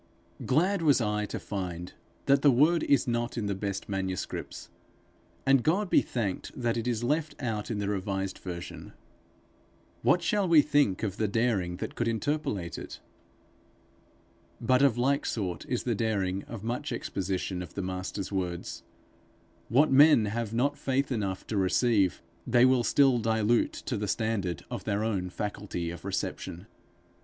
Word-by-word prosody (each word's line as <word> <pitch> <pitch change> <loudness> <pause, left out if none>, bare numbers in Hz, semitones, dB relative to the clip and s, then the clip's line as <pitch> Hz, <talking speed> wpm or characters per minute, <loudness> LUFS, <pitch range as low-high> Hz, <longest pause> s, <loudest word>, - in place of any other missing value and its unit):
Glad 175 +8 +2
was 150 -5 +4
I 105 -2 -1
to - - -5
find 90 -3 -5 0.3
that 140 0 +4
the 145 - +6
word 150 +6 +4
is 140 -3 +2
not 120 0 -1
in 110 - -1
the 100 - 0
best 100 0 -4
manuscripts; 95 -2 -4 0.7
and 135 -1 +5
God 180 - +1
be - - +6
thanked 105 0 -4
that 120 -2 0
it 115 0 -2
is 120 -1 -1
left 150 +5 0
out 110 -5 -3
in 115 - -2
the 100 -1 -2
revised 95 -1 -2
version. 90 -2 -7 1.1
What - - +3
shall 205 -2 +1
we 160 -4 +6
think 145 -11 +2
of 100 -3 -2
the 110 - +1
daring 100 -5 0
that - - -5
could 120 - -1
interpolate 115 - -2
it! - - -9 1.6
But 130 0 +3
of 135 -5 +4
like 140 +3 +2
sort 90 -7 -3
is 125 - -1
the 120 - 0
daring 100 -4 -1
of 110 -3 -8
much 125 +6 -3
exposition 95 -5 -3
of 90 - -9
the 100 - -3
Master's 95 +2 -4
words. 90 -3 -3 0.9
What 140 +7 +4
men 140 -4 +7
have 110 +1 -3
not 140 +5 0
faith 135 0 0
enough 100 -6 -2
to 110 - -3
receive, 100 0 +2 0.2
they 120 +1 +5
will 130 -2 +4
still 135 -1 +4
dilute 110 +1 +2
to - - -4
the 105 - -2
standard 100 -8 -1
of - - -4
their 105 0 -1
own 95 -5 -1
faculty 95 -3 -4
of 85 - -9
reception. 95 -2 -4
110 Hz, 160 wpm, -29 LUFS, 95-130 Hz, 1.6 s, men